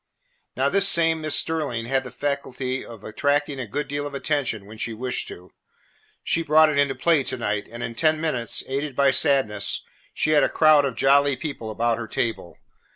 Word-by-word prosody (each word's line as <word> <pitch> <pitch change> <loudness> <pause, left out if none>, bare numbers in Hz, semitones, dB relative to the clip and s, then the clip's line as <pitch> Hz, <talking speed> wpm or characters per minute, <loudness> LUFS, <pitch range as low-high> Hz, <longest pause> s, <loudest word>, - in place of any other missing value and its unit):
Now, - - +2
this 200 0 +5
same 165 -3 +4
Miss 155 -1 +1
Sterling 145 -8 0
had 135 +2 0
the 125 - -8
faculty 130 -1 -4
of 115 -3 -12
attracting 145 +4 -1
a 125 - -5
good 145 +8 -4
deal 145 0 -4
of 140 - -9
attention 135 -8 -2
when 110 +2 -13
she 115 - -3
wished 125 +3 -3
to. 90 +1 -10 0.7
She 165 - 0
brought 155 0 +4
it 145 -2 0
into 140 -1 +1
play 165 -4 +2
to - - 0
night, 105 -3 -3
and 120 +1 -7
in 115 - -5
ten 155 +5 +1
minutes, 130 -8 -1
aided 140 +1 -4
by 140 0 +3
Sadness, 110 - +1 0.3
she 155 - -1
had 150 -1 +5
a - - +2
crowd 155 -2 +4
of 130 -4 -3
jolly 140 0 +3
people 130 -5 -6
about 115 +2 -1
her 115 - -6
table. 110 -7 -4
135 Hz, 200 wpm, -23 LUFS, 115-150 Hz, 0.7 s, this